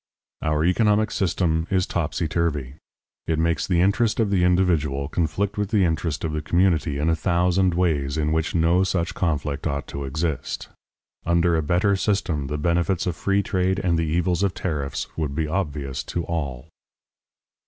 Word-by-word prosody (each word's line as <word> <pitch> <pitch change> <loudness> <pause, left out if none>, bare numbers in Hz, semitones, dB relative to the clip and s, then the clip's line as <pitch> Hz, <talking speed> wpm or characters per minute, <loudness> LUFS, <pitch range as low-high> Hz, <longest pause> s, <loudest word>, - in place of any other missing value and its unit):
Our 75 0 +1
economic 105 +3 +3
system 85 -4 0
is 95 -1 +2
topsyturvy. 80 -4 -1 0.5
It 80 - +1
makes 80 -1 0
the 85 -3 +2
interest 105 +4 +2
of 110 -3 +1
the 95 -3 +2
individual 85 -7 +2
conflict 95 +7 -1
with 105 -2 -1
the 105 -4 +3
interest 80 -2 -1
of 80 - -1
the 75 0 -2
community 80 -2 +1
in 75 +2 0
a 80 - +3
thousand 90 +2 +2
ways 80 -5 0
in 75 0 0
which 80 +2 -1
no 85 +3 +3
such 90 -3 -1
conflict 75 -5 -1
ought 70 -1 -2
to 70 0 -5
exist. 80 +2 -3 0.5
Under 85 0 +2
a 80 - +2
better 90 +6 +2
system 95 -8 -1
the 75 +2 -3
benefits 85 +3 0
of 90 -3 -1
free 100 +4 +1
trade 95 0 0
and 90 -4 +1
the 80 -1 0
evils 85 +3 0
of 100 -2 +1
tariffs 75 -6 -3
would 75 -4 -2
be 80 0 0
obvious 75 -6 -3
to 85 - -3
all. 70 -4 -4
85 Hz, 170 wpm, -23 LUFS, 75-90 Hz, 0.5 s, economic